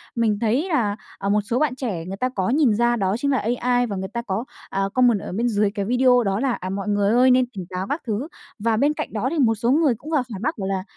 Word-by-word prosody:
mình 220 -3 +1
thấy 245 - +1
là, 220 - +1 0.2
à, 200 0 -3
một 210 +1 +3
số 230 +5 -1
bạn 300 -5 +1
trẻ 200 -11 -4
người 195 +1 -6
ta 255 +3 0
có 190 -5 -2
nhìn 270 -4 +3
ra 240 +2 +2
đó 195 -2 0
chính 280 +2 0
là 265 - +2 0.2
AI 245 0 +2
và 200 - -4
người 190 0 -4
ta 235 - -2
có, 220 0 -3 0.3
à, 195 - -2
comment 245 -4 +4
ở - - -7
bên 230 +6 0
dưới 210 -3 +1
cái 200 -1 -3
video 250 +1 +4
đó 195 0 0
là, 265 0 +1
à, 185 - -5
mọi 195 +1 -4
người 205 -1 +2
ơi 255 +1 +5
nên 255 0 +4
tỉnh 185 -2 -5
táo 185 +1 -4
các 295 - -2
thứ, 225 +7 -2 0.3
và 225 0 +1
bên 290 +4 +2
cạnh - - -5
đó - - -1
thì 335 - -1
một 225 -5 +3
số 235 +4 0
người 290 -5 +3
cũng 300 +8 -10
vào 295 -5 +2
phản 195 - -6
bác 285 - -1
bảo 195 -1 -3
là, 190 -1 -2
230 Hz, 290 wpm, -22 LUFS, 200-255 Hz, 0.3 s, ơi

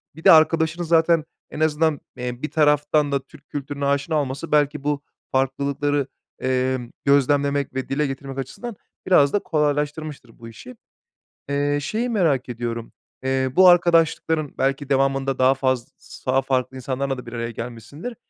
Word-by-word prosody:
Bir 160 - -12
de - - +8
arkadaşını 160 +1 +4
zaten 165 -1 +3 0.3
en 150 - -8
azından, 155 -1 +2 0.2
eee, 125 0 -5
bir 150 - -4
taraftan 150 -1 +2
da 140 - +1
Türk 140 +1 -19
kültürüne 140 0 -4
aşina 140 +2 +1
olması 140 +4 -5
belki 150 -1 +2
bu 145 -1 -1 0.3
farklılıkları, 140 +1 0 0.3
emm, 130 -1 -1 0.2
gözlemlemek 140 0 +2
ve 130 0 -4
dile 145 +1 0
getirmek 135 0 -6
açısından 215 - -6 0.3
biraz 145 -7 +4
da 205 - +3
kolaylaştırmıştır 150 -5 -2
bu 115 - -10
işi. 120 +3 -12 0.7
Eee, 145 +1 0
şeyi 230 - -2
merak 160 - +1
ediyorum, 115 -1 -5 0.3
eee, 130 0 0
bu 185 0 +8
arkadaşlıkların 165 -3 +3
belki 135 +1 0
devamında 135 -1 +1
daha 130 +1 +5
faz 130 -3 -1
s - - -14
daha 135 +1 +3
farklı 130 0 -1
insanlarla 135 +1 -3
da 125 - -9
bir 120 - -9
araya 115 0 -3
gelmişsindir. 125 - -7
140 Hz, 155 wpm, -22 LUFS, 130-150 Hz, 0.7 s, de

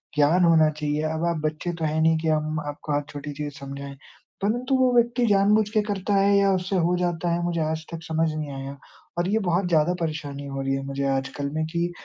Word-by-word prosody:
ज्ञान 155 +5 +4
होना 160 -2 +5
चाहिए, 150 0 -2
अब 160 +2 -1
आप 165 - -4
बच्चे 155 +3 -2
तो 165 -1 -3
हैं 155 +1 0
नहीं 160 0 +4
कि 160 - -3
हम 155 0 0
आपको 145 0 -4
हर 145 - +1
छोटी 145 0 -6
चीज़ 145 0 -5
समझाएँ। 140 0 -7 0.4
परंतु 245 +6 0
वो 255 -1 +4
व्यक्ति 240 +1 +3
जानबूझ 205 +1 +4
के 215 0 +2
करता 205 -1 -2
है 200 +1 +4
या 200 0 +4
उससे 185 +1 -2
हो 175 +1 +2
जाता 175 -1 -1
है, 170 0 -1
मुझे 170 -1 -1
आज 160 +1 -2
तक 165 -1 -6
समझ 160 0 0
नहीं 155 -2 -4
आया 135 +1 -6 0.4
और 175 - +1
ये 220 - +2
बहुत 175 +2 +1
ज़्यादा 165 +1 +3
परेशानी 145 -3 -4
हो 135 0 -4
रही 135 0 -1
है 135 - -2
मुझे 140 0 -3
आज 135 0 0
कल 140 0 -2
में 155 0 -1
कि 170 +1 -1
160 Hz, 235 wpm, -25 LUFS, 145-180 Hz, 0.4 s, होना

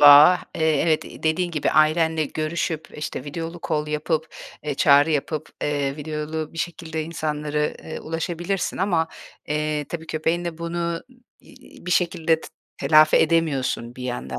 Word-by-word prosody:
bağ. 145 +5 +9 0.2
Eee, 160 -2 +2
evet, 160 -2 +2
iii, - - -11
dediğin 170 +3 +1
gibi 155 -3 0
ailenle 155 +1 +3
görüşüp, 155 +1 -3
işte, 150 -3 -4
videolu 165 +3 -5
call 150 -2 0
yapıp, 155 +1 -1 0.4
eee, 150 -2 -2
çağrı 145 +3 +5
yapıp, 150 +1 -1
eee, 145 -1 -1
videolu 155 +1 -4
bir 165 - -9
şekilde 160 -2 -3
insanları, 150 -2 -2
eee, 155 - -6
ulaşabilirsin 170 +3 -2
ama, 170 -4 +1 0.4
eee, 150 0 -1
tabii 165 -1 -6
köpeğinle 165 +1 -1
bunu, 170 0 -4
ım 170 0 -2 0.4
iii, - - -17
bir - - -2
şekilde 165 -2 +2
t - - -10 0.3
telafi 155 +2 +6
edemiyorsun 150 -7 +1
bir 130 - -8
yandan 65 - -4
155 Hz, 150 wpm, -23 LUFS, 150-165 Hz, 0.4 s, bağ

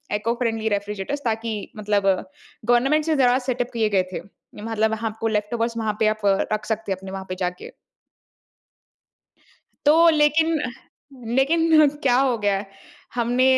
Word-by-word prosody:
Eco friendly 225 0 -1
refrigerators 205 +7 -3
ताकि 225 -2 -3
मतलब 205 -1 0 0.6
government 270 +6 +3
से 320 -1 +1
ज़रा 255 -2 +4
सेटअप 245 0 -1
किए 220 -2 +1
गए 195 -3 +2
थे। - - -4 0.4
मतलब 220 0 0
आपको 225 0 -2
लेफ़्टओवर्स 230 +2 -1
वहाँ 220 -2 -1
पे 215 - +3
आप 215 0 -1 0.3
रख 215 0 -2
सकते 220 -2 -3
हैं 190 - -1
अपने 190 0 -9
वहाँ 195 0 -6
पे 185 - -3
जाके। 180 -1 -4 2.2
तो 330 +3 +6
लेकिन 315 +1 +3
अ, 250 - -2 0.7
लेकिन 315 +2 +4
क्या 250 -3 +3
हो 260 -3 +2
गया 205 -2 +1
है? 195 - -5 0.5
हमने 245 +1 +1
225 Hz, 145 wpm, -23 LUFS, 210-265 Hz, 2.2 s, तो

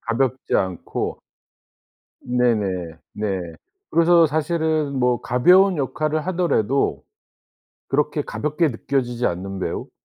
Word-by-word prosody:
가볍지 130 +2 0
않고 95 -3 -3 1.0
네네. 105 -9 0 0.2
네. 100 -3 -2 0.5
그래서 170 0 +5
사실은 155 -1 0
뭐 125 -1 +1
가벼운 180 +9 +4
역할을 155 +3 -1
하더라도 165 - 0 0.9
그렇게 150 +2 0
가볍게 150 +3 -1
느껴지지 125 -1 -2
않는 95 +2 -3
배우? - - -4
135 Hz, 235 characters per minute, -22 LUFS, 115-155 Hz, 1.0 s, 그래서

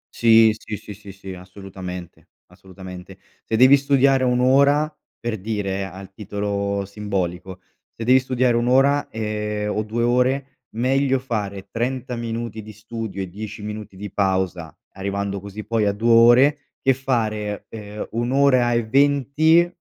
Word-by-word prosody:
Sì, 115 -1 +5
sì, 110 -1 -7
sì, 105 - -10
sì, 100 0 -12
sì, 95 -1 -9
assolutamente, 90 -1 -9 0.2
assolutamente. 95 0 -11 0.3
Se 110 - -2
devi 130 +3 +8
studiare 135 -1 +3
1 125 0 +2
ora 140 +4 +3 0.2
per 115 -3 -3
dire 100 -2 -3
al 95 +1 -10
titolo 100 -1 -3
simbolico, 95 -3 -4 0.3
se 115 - -8
devi 130 +3 +5
studiare 130 -1 +1
1 120 +1 +1
ora, 140 +3 +3
ehm, 105 -1 -3
o 105 - 0
2 110 +2 -2
ore, 130 +3 +1 0.2
meglio 135 +3 +2
fare 105 -6 -4
30 125 +1 -3
minuti 115 -1 -4
di 105 0 -11
studio 110 -2 -6
e - - -6
10 105 +3 -8
minuti 105 -2 -7
di 100 0 -7
pausa, 95 -5 -1
arrivando 100 +1 -3
così 100 +2 -8
poi 115 -2 0
a 100 - +2
2 115 +3 +1
ore, 120 +6 +6 0.2
che 135 - +3
fare, 110 -6 -2
ehm, 105 -1 -7
1 120 +2 -2
ora 130 -3 +4
e 120 -1 0
20, 145 +6 +3
110 Hz, 150 wpm, -22 LUFS, 100-125 Hz, 0.3 s, devi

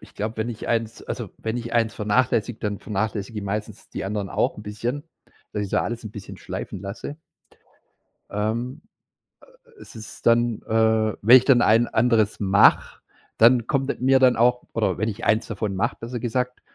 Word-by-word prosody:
ich - - -16
glaube, 110 +2 -4
wenn 110 +1 -2
ich 115 -3 -6
eins 115 -1 -1
also - - -5
wenn 110 +1 -3
ich 120 -1 -5
eins 115 -1 +1
vernachlässige, 115 +1 0
dann 105 -1 -3
vernachlässige 105 +1 -3
ich 100 - -5
meistens 105 +2 -5
die - - -5
anderen 100 -1 -3
auch - - 0
‘n 105 - -9
bisschen, 120 +8 -4 0.5
dass 105 - -2
ich 100 - -4
da - - +1
alles 120 +1 -4
‘n 110 - -6
bisschen 105 -1 -9
schleifen 95 - -6
lasse. 100 +9 -7 1.1
Ähm, 110 +5 -3 0.8
äh, 480 - -24
es - - -13
ist 110 -1 -11
dann 115 -1 +3
äh, 110 -1 +2
wenn 115 +5 +9
ich 130 - +5
dann 130 -3 +5
ein 115 +2 +4
anderes 110 -2 +2
mache, 100 0 +4 0.4
dann 120 0 +5
kommt 135 -2 0
mit - - -3
mir 130 +1 +4
dann 130 -1 +4
auch 125 +2 +2
oder 100 -6 0
wenn 110 - 0
ich 110 +1 -5
eins 110 +1 +2
davon 105 -2 -3
mache, 115 +5 -1
besser 120 +1 -5
gesagt, 125 +2 -2
110 Hz, 190 wpm, -23 LUFS, 105-120 Hz, 1.1 s, wenn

